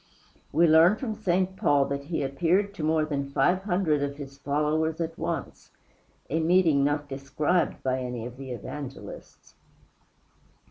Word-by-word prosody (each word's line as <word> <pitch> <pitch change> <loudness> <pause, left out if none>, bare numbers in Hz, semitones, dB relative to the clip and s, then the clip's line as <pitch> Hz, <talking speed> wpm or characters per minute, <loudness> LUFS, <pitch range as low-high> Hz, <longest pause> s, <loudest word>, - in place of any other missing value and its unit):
We 165 +4 +4
learn 165 +5 +6
from 225 -1 -4
St. 190 -3 0
Paul 145 -5 +3
that 140 0 -3
he 160 -1 -2
appeared 175 +9 +1
to 165 - -6
more 155 0 +2
than 140 -2 -3
five 180 +6 +2
hundred 175 -6 +1
of 140 0 -3
his 140 -1 -9
followers 150 +3 0
at 165 -1 -3
once - - -5 0.6
a 160 - -1
meeting 165 -4 +3
not 145 +1 0
described 145 +5 -1
by 130 0 0
any 125 -2 -4
of 125 +1 -8
the 135 -1 -8
Evangelists. 135 +3 -8
150 Hz, 150 wpm, -27 LUFS, 140-175 Hz, 0.6 s, learn